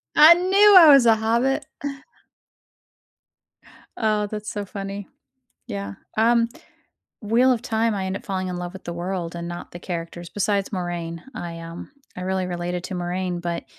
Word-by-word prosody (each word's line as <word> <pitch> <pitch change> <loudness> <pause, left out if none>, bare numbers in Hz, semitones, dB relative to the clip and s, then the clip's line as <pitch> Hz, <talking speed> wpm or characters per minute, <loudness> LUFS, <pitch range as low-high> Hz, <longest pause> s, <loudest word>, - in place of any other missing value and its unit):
I 310 +3 +10
knew 390 +3 +5
I 325 -4 +10
was 275 -4 +7
a 225 - +6
hobbit. 235 +5 0 2.3
Oh, 215 -2 +1
that's 210 0 -6
so 205 -1 -4
funny. 195 0 -6 0.6
Yeah, 100 0 -5 0.2
um, 230 +1 +4 0.8
Wheel 240 +5 +3
of 235 -1 -2
Time, 225 -2 0
I 190 -1 -2
end 190 +1 -3
up - - -9
falling 185 -2 -3
in 180 - -4
love 175 0 -5
with 190 - -11
the 170 - -5
world 175 -1 -4
and 170 0 -5
not 175 0 -7
the 175 - -8
characters, 170 -1 -6
besides 200 -1 -1
Moiraine. 175 -3 -4
I, 170 -1 -6
um 165 +1 -9 0.3
I 180 - -5
really 190 0 -1
related 175 0 -4
to 185 - -5
Moiraine, 180 0 -3
but 170 -1 -3
190 Hz, 165 wpm, -23 LUFS, 175-220 Hz, 2.3 s, I